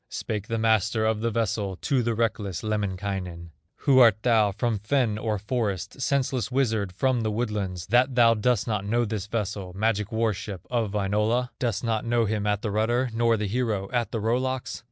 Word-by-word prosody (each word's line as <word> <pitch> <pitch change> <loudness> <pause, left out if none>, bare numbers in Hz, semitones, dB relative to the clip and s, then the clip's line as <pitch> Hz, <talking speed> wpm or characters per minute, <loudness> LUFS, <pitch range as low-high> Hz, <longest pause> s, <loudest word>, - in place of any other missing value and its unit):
Spake 105 -2 -4
the 115 - -1
master 110 0 +2
of 110 -1 0
the 115 - +1
vessel 105 -3 -1
To 130 +7 0
the 115 -1 -1
reckless 110 -5 -1
Lemminkainen: 95 -5 -3 0.3
"Who 135 -3 +5
art 115 -5 +7
thou 110 -4 +4
from 105 +2 -1
fen 110 -1 0
or 110 -1 -1
forest, 105 +1 -3
Senseless 130 -2 0
wizard 110 -7 0
from 125 +6 +1
the 110 - 0
woodlands, 105 -6 -2
That 125 +4 +3
thou 115 -2 +6
dost 115 0 +1
not 105 -4 -1
know 120 +4 +1
this 105 -3 -4
vessel, 100 -4 -3
Magic 105 0 0
war 110 -1 +1
ship 95 -2 -7
of 115 -4 0
Wainola? 105 +5 +1
Dost 115 -4 -1
not 115 -2 0
know 115 0 +1
him 105 -1 -1
at 105 -1 0
the 110 - -1
rudder, 120 +4 +1
Nor 115 0 +2
the 105 - -2
hero 105 -3 -1
at 120 -2 -1
the 115 - -2
row 115 +3 +1
locks?" 130 -1 -3
110 Hz, 195 wpm, -26 LUFS, 100-120 Hz, 0.3 s, art